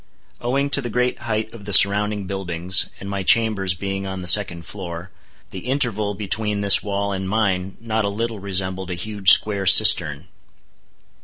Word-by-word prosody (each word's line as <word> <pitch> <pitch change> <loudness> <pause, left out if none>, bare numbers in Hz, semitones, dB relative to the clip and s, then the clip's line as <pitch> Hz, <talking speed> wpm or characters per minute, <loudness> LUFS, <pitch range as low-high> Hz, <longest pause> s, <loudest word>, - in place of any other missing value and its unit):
Owing 140 +4 -2
to 140 - 0
the 120 - -6
great 125 +2 -2
height 110 -2 -5
of 110 -4 -13
the 100 - -7
surrounding 105 +1 +3
buildings, 90 -2 0
and 100 - -10
my 100 0 -5
chambers 95 -3 +1
being 95 +1 -6
on 95 0 -6
the 90 - -8
second 90 -3 +3
floor, 90 -2 -9 0.4
the 95 +5 -9
interval 110 -7 -2
between 105 +1 -2
this 100 -1 +5
wall 100 0 -4
and 95 -1 -5
mine 95 -3 -2
not 110 -1 -3
a 100 - -2
little 115 +1 -5
resembled 95 -1 -2
a 90 - -4
huge 100 +1 0
square 100 -1 +4
cistern. - - +5
100 Hz, 170 wpm, -20 LUFS, 95-110 Hz, 0.4 s, this